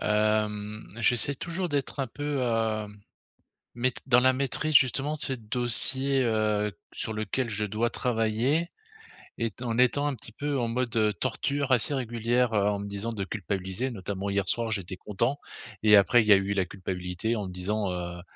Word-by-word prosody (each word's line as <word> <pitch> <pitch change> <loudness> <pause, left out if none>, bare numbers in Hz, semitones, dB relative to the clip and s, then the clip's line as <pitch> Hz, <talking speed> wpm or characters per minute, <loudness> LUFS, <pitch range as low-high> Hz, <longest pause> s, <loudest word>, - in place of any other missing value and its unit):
hem 105 0 0
j'essaie 120 +4 +3
toujours 170 +5 -4
d'être 140 0 -2
un 135 - 0
peu, 145 +2 -3
heu, 110 -2 0 0.9
mait 125 +1 +1
dans 125 -2 +6
la 130 +1 +4
maîtrise 140 +4 -1
justement 135 +3 +4
de 155 - -5
ce 135 - -1
dossier, 130 +3 +2
heu, 105 -3 0 0.2
sur 110 - -2
lequel 110 +4 -2
je 105 -1 -1
dois 110 +3 -1
travailler, 120 +6 0 0.7
étant 115 +1 -3
en 115 +1 -1
étant 135 +3 +3
un 145 - 0
petit 115 -2 -10
peu 145 +3 -2
en 120 - 0
mode, 120 0 -2
heu, 110 -2 +3
torture 140 +8 -2
assez 130 +3 +3
régulière 120 -1 0
en 105 -1 +2
me 100 0 -5
disant 100 +3 -3
de 100 -3 -3
culpabiliser 95 +3 -3
notamment 100 -3 -4
hier 100 -1 0
soir, 115 +2 0
j'étais 95 -4 -3
content 105 +9 -1 0.4
et 105 -1 +7
après 110 +5 +5
il 110 - -3
y 105 - +9
a - - +8
eu 100 +1 0
la 95 -2 +1
culpabilité 90 +3 -3
en 105 -3 -3
me - - -7
disant, 95 +2 -2
heu 85 -1 -5
110 Hz, 180 wpm, -27 LUFS, 105-130 Hz, 0.9 s, y